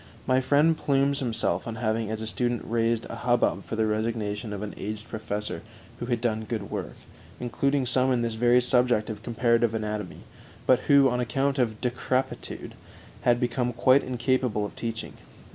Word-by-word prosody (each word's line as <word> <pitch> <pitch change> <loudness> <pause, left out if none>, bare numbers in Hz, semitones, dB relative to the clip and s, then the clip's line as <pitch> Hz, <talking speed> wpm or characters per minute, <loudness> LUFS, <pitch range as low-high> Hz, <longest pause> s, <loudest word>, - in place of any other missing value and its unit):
My 130 0 +3
friend 145 +5 +4
plumes 140 -1 +1
himself 115 -8 -1
on 115 - -4
having 110 -1 -1
as 110 0 -3
a - - -3
student 120 +2 -1
raised 115 0 0
a - - -7
hubbub 120 -1 +1
for - - -4
the 110 0 +2
resignation 110 -1 -2
of 105 0 -4
an 105 - -5
aged 110 +2 -6
professor 105 -1 -4 0.4
who 120 - -4
had 120 -2 0
done 110 -2 -1
good 110 -3 -4
work - - -4 0.4
(including 135 +3 0
some 130 +1 +2
in 120 -2 +1
this 115 -1 -1
very 120 +2 +4
subject 125 -3 +2
of 105 -1 -8
comparative 115 0 +2
anatomy), 105 -3 -4 0.4
but 130 -1 +5
who, 140 -2 +7
on 125 -1 0
account 135 +4 0
of 110 -4 0
decrepitude, 130 +1 -2 0.5
had 120 -1 +3
become 125 0 0
quite 130 +3 +5
incapable 125 -4 0
of - - -8
teaching. 115 -1 -5
120 Hz, 175 wpm, -27 LUFS, 110-125 Hz, 0.5 s, who